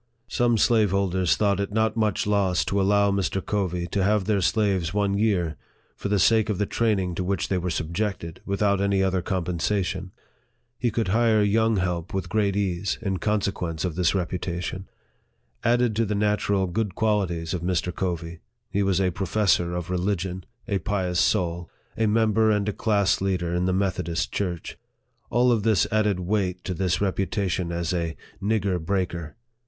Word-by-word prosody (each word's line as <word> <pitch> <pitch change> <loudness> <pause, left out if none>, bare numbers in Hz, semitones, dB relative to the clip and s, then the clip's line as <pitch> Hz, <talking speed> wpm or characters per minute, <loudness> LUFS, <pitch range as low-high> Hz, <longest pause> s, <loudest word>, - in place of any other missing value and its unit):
Some 120 -1 +2
slaveholders 100 -6 +2
thought 100 -2 +2
it 100 0 -2
not 110 +1 +1
much 110 -2 0
loss 100 -3 +1
to 100 0 0
allow 100 +1 +3
Mr. 95 0 0
Covey 90 -4 -1
to 95 +2 0
have 105 0 +2
their 105 -1 +1
slaves 95 -4 +1
one 100 -1 +1
year, 95 -7 +1 0.4
for 100 - -4
the 105 - +2
sake 110 +2 +3
of 105 - 0
the 105 - +1
training 100 -5 0
to 90 - -2
which 95 +2 -1
they 95 - +1
were 90 +1 -2
subjected, 85 +1 -3
without 100 0 +1
any 100 -1 +2
other 95 -1 +1
compensation. 90 +1 -2 0.7
He 120 - +1
could 110 -3 -1
hire 110 0 +3
young 110 +1 +2
help 90 +1 -2
with 95 - -3
great 105 -3 +1
ease, 95 -1 -1
in 95 -2 -1
consequence 95 -6 -1
of 90 - -2
this 90 +2 +1
reputation. 90 +1 -3 0.8
Added 120 -1 +2
to 115 - +2
the 105 0 -1
natural 100 -1 +1
good 95 +2 -2
qual 105 -3 +2
ities 85 -2 -4
of 90 - -2
Mr. 90 0 -1
Covey, 85 -2 -3 0.3
he 100 - +1
was 95 -2 +2
a 95 -1 +2
professor 90 -2 +1
of 90 +1 -4
religion 90 0 -2 0.2
a 100 -4 0
pious 95 -4 -1
soul 85 -2 +1 0.3
a 110 0 +1
member 110 0 +3
and 105 -1 +1
a 105 - 0
class 100 -3 +1
leader 90 -3 -1
in 90 +1 0
the 95 - +1
Meth 95 0 0
odist 85 -1 -2
church. 90 -4 -4 0.5
All 120 +1 +3
of 115 -3 +2
this 110 -3 +3
added 105 -3 +2
weight 90 -1 -1
to 95 - -3
his 90 -1 0
reputa 100 +1 -1
tion 85 0 -2
as 85 0 -2
a 85 -2 -2
" - - -28
nigger 100 -4 0
breaker." 90 -3 -2
95 Hz, 180 wpm, -25 LUFS, 90-105 Hz, 0.8 s, allow